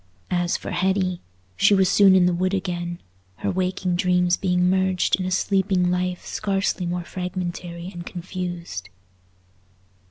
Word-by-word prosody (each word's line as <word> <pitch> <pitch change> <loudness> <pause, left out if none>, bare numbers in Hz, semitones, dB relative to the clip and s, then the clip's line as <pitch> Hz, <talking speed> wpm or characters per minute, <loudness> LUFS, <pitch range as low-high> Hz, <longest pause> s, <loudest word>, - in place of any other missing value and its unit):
As 175 -1 +1
for - - -7
Hetty, 185 -1 0 0.3
she 200 - +5
was 190 -1 +4
soon 195 0 +6
in 185 -1 +5
the 180 - +3
wood 185 +3 0
again—her 170 - -5
waking 185 0 -1
dreams 180 0 +3
being 180 -1 +1
merged 185 0 +2
in 185 - -2
a - - -1
sleeping 190 -1 +1
life 180 0 -2
scarcely 195 -3 -1
more 175 0 -2
fragmentary 180 -1 -5
and 175 -1 -7
confused. 175 - -6
180 Hz, 135 wpm, -23 LUFS, 175-185 Hz, 0.3 s, soon